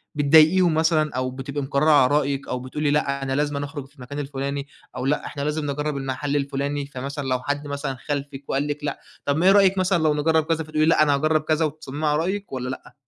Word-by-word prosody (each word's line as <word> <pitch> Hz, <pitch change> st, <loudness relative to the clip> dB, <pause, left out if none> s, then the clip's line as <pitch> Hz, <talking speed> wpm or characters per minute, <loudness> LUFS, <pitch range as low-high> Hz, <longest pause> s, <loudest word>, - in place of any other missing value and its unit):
بتضايقيهم 160 Hz, +4 st, +5 dB
مثلًا، 160 Hz, -1 st, +2 dB
أو 130 Hz, 0 st, -1 dB
بتبقى 140 Hz, +2 st, -5 dB
مقررة 140 Hz, +3 st, +2 dB
على 145 Hz, -4 st, +6 dB
رأيك، 140 Hz, -1 st, -1 dB
أو 125 Hz, -, -2 dB
بتقولي 145 Hz, +3 st, -2 dB
لأ 140 Hz, -2 st, 0 dB
أنا 135 Hz, -, -2 dB
لازمًا 145 Hz, -1 st, -1 dB
أخرج 145 Hz, -2 st, -7 dB
في 145 Hz, -, -29 dB
المكان 135 Hz, +1 st, -7 dB
الفلاني، 140 Hz, 0 st, -4 dB, 0.3 s
أو 125 Hz, -, -3 dB
لأ 150 Hz, -, 0 dB
إحنا 140 Hz, -, -6 dB
لازم 150 Hz, -1 st, -1 dB
نجرّب 150 Hz, 0 st, -2 dB
المحل 135 Hz, +2 st, -3 dB
الفلاني، 140 Hz, 0 st, -2 dB
فمثلًا 140 Hz, +1 st, -5 dB
لو 130 Hz, -1 st, +1 dB
حد 145 Hz, +3 st, -3 dB
مثلًا 140 Hz, -1 st, -3 dB
خالفِك 140 Hz, -1 st, -4 dB
وقال 140 Hz, +2 st, 0 dB
لِك 145 Hz, 0 st, -4 dB
لأ، 145 Hz, -, -3 dB, 0.3 s
طَب 140 Hz, +1 st, +1 dB
ما 170 Hz, -, +1 dB
إيه 190 Hz, -, +8 dB
رأيِك 195 Hz, -1 st, +5 dB
مثلًا 185 Hz, -3 st, +2 dB
لو 155 Hz, -1 st, +3 dB
نجرّب 160 Hz, +1 st, +2 dB
كذا، 165 Hz, 0 st, 0 dB
فتقولي 155 Hz, 0 st, 0 dB
لأ 160 Hz, -1 st, +5 dB
أنا 145 Hz, -2 st, +3 dB
هاجرب 155 Hz, +2 st, +2 dB
كذا، 155 Hz, +1 st, +1 dB
وتصممي 155 Hz, 0 st, -5 dB
علي 150 Hz, 0 st, +2 dB
رأيِك، 195 Hz, +4 st, -2 dB
والّا 125 Hz, -1 st, -3 dB
لأ؟ 130 Hz, -, -8 dB
145 Hz, 225 wpm, -23 LUFS, 140-155 Hz, 0.3 s, إيه